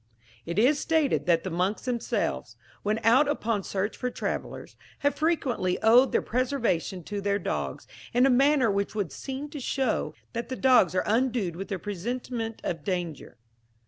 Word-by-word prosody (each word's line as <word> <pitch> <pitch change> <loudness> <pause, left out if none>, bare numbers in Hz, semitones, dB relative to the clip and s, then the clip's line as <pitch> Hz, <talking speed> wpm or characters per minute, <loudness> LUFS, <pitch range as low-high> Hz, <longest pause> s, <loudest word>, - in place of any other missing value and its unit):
"It 170 - -3
is 265 +7 +4
stated 315 - +1
that 165 -2 +3
the 185 - -4
monks 180 +5 -1
themselves, 245 -2 -2 0.2
when 210 +1 0
out 250 +7 +5
upon 230 -7 0
search 195 +2 -2
for 250 - -2
travellers, - - -5 0.3
have 285 - +4
frequently 270 - 0
owed 240 +4 +6
their - - +1
preservation 235 - -1
to 205 +2 -4
their 200 0 +1
dogs, - - -3 0.3
in 245 +2 +4
a - - +5
manner 270 -2 +4
which 200 +1 -1
would 200 -8 -2
seem 270 - -5
to 300 - -6
show 265 -2 -1 0.2
that 235 +1 -4
the 260 - -3
dogs 250 -10 +4
are 185 - +1
endued 225 -6 +1
with 195 +3 -7
a 195 - -1
presentiment 225 +4 -4
of 165 -4 -3
danger. 175 -9 -4
225 Hz, 170 wpm, -27 LUFS, 195-260 Hz, 0.3 s, owed